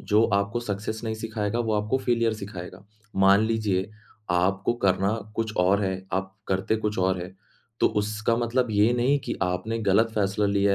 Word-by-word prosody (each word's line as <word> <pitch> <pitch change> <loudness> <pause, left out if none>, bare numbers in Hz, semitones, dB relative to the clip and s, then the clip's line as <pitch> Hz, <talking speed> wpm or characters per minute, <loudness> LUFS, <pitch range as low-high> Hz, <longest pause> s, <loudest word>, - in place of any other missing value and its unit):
जो 105 +2 +3
आपको 100 +4 0
सक्सेस 110 0 -4
नहीं 110 -1 -2
सिखाएगा, 110 0 -3
वो 115 -2 0
आपको 105 +5 0
फेलियर 115 -3 +1
सिखाएगा। 100 -3 -8 0.3
मान 95 +1 +6
लीजिए 105 -4 0 0.4
आपको 95 +4 +1
करना 95 +2 +3 0.2
कुछ 110 -1 -2
और 95 +3 +3
है, 95 0 -3
आप 95 0 -1 0.2
करते 95 +3 +1
कुछ 105 -1 -2
और 95 0 +2
है, 90 +1 -9 0.5
तो - - +5
उसका 110 +2 0
मतलब 120 +1 0
ये 105 +2 +4
नहीं 130 +4 +2
कि - - -2
आपने 90 +5 -1
गलत 110 +1 +3
फैसला 100 0 +1
लिया 100 0 +2
105 Hz, 175 wpm, -26 LUFS, 95-110 Hz, 0.5 s, मान